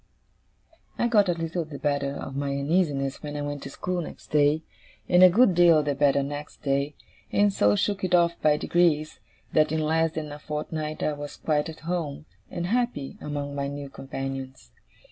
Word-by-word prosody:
I 235 Hz, -, +2 dB
got 210 Hz, -5 st, +4 dB
a -, -, +3 dB
little 165 Hz, +1 st, -2 dB
the 150 Hz, -2 st, -9 dB
better 140 Hz, 0 st, -1 dB
of 135 Hz, -, -6 dB
my 140 Hz, 0 st, -2 dB
uneasiness 140 Hz, -1 st, 0 dB
when 150 Hz, -1 st, -5 dB
I 145 Hz, -, -3 dB
went 145 Hz, -1 st, -4 dB
to -, -, -7 dB
school 180 Hz, +5 st, -3 dB
next -, -, -10 dB
day, 150 Hz, +1 st, +3 dB, 0.4 s
and 180 Hz, 0 st, +5 dB
a 185 Hz, -, +10 dB
good 210 Hz, +2 st, +5 dB
deal 170 Hz, -3 st, +5 dB
the 145 Hz, -1 st, 0 dB
better 140 Hz, 0 st, +3 dB
next 145 Hz, +1 st, -7 dB
day, 140 Hz, +1 st, 0 dB, 0.4 s
and 205 Hz, -1 st, +3 dB
so 105 Hz, -, +3 dB
shook 200 Hz, -, -1 dB
it 180 Hz, -1 st, +3 dB
off 170 Hz, -1 st, +4 dB
by 150 Hz, -1 st, +4 dB
degrees, 155 Hz, -2 st, +1 dB, 0.3 s
that 155 Hz, -1 st, +3 dB
in 160 Hz, 0 st, 0 dB
less 160 Hz, +1 st, +1 dB
than 155 Hz, -2 st, -4 dB
a 145 Hz, -, -8 dB
fortnight 150 Hz, +1 st, -4 dB
I 155 Hz, -, +1 dB
was 145 Hz, 0 st, -7 dB
quite 150 Hz, 0 st, 0 dB
at 160 Hz, -, -10 dB
home, 160 Hz, -4 st, -3 dB, 0.2 s
and 175 Hz, -1 st, -4 dB
happy, 235 Hz, -, -1 dB
among 145 Hz, -1 st, -4 dB
my 140 Hz, 0 st, -2 dB
new 140 Hz, 0 st, -6 dB
companions. 135 Hz, -, -6 dB
150 Hz, 190 wpm, -26 LUFS, 140-170 Hz, 0.4 s, a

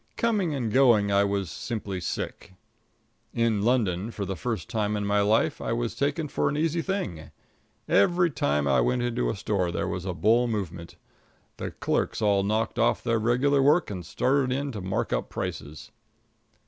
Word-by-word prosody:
Coming 205 Hz, -9 st, +1 dB
and 120 Hz, -6 st, -2 dB
going 120 Hz, -6 st, +4 dB
I 100 Hz, 0 st, +4 dB
was 100 Hz, -3 st, -1 dB
simply 105 Hz, -5 st, -4 dB
sick. 95 Hz, +2 st, -5 dB, 0.8 s
In 115 Hz, -3 st, +1 dB
London, 105 Hz, -4 st, +1 dB
for 105 Hz, -3 st, -5 dB
the 95 Hz, -, -3 dB
first 115 Hz, +2 st, -3 dB
time 105 Hz, -2 st, -1 dB
in 105 Hz, -, -2 dB
my 100 Hz, 0 st, +2 dB
life, 105 Hz, +2 st, +2 dB
I 115 Hz, -, -2 dB
was 120 Hz, 0 st, -2 dB
taken 145 Hz, +3 st, -1 dB
for -, -, 0 dB
an 145 Hz, -, -2 dB
easy 165 Hz, +2 st, 0 dB
thing. 165 Hz, -, -4 dB, 0.6 s
Every 175 Hz, -, +3 dB
time 75 Hz, -, 0 dB
I 70 Hz, -1 st, +3 dB
went 125 Hz, -1 st, +1 dB
into 115 Hz, -, -1 dB
a -, -, -2 dB
store 95 Hz, -4 st, -1 dB
there -, -, -2 dB
was 90 Hz, 0 st, -4 dB
a 90 Hz, -2 st, -3 dB
bull 115 Hz, +6 st, +3 dB
movement. 90 Hz, -6 st, -4 dB, 0.6 s
The -, -, -4 dB
clerks -, -, -1 dB
all 100 Hz, -2 st, +3 dB
knocked 110 Hz, +4 st, -1 dB
off 115 Hz, -, +2 dB
their 115 Hz, -2 st, +1 dB
regular 130 Hz, +5 st, +2 dB
work 150 Hz, 0 st, +3 dB
and 90 Hz, -3 st, -5 dB
started 130 Hz, -, +1 dB
in 140 Hz, +2 st, -1 dB
to 105 Hz, -5 st, -6 dB
mark 95 Hz, +1 st, -2 dB
up -, -, -2 dB
prices. 80 Hz, 0 st, -6 dB
110 Hz, 180 wpm, -26 LUFS, 95-130 Hz, 0.8 s, going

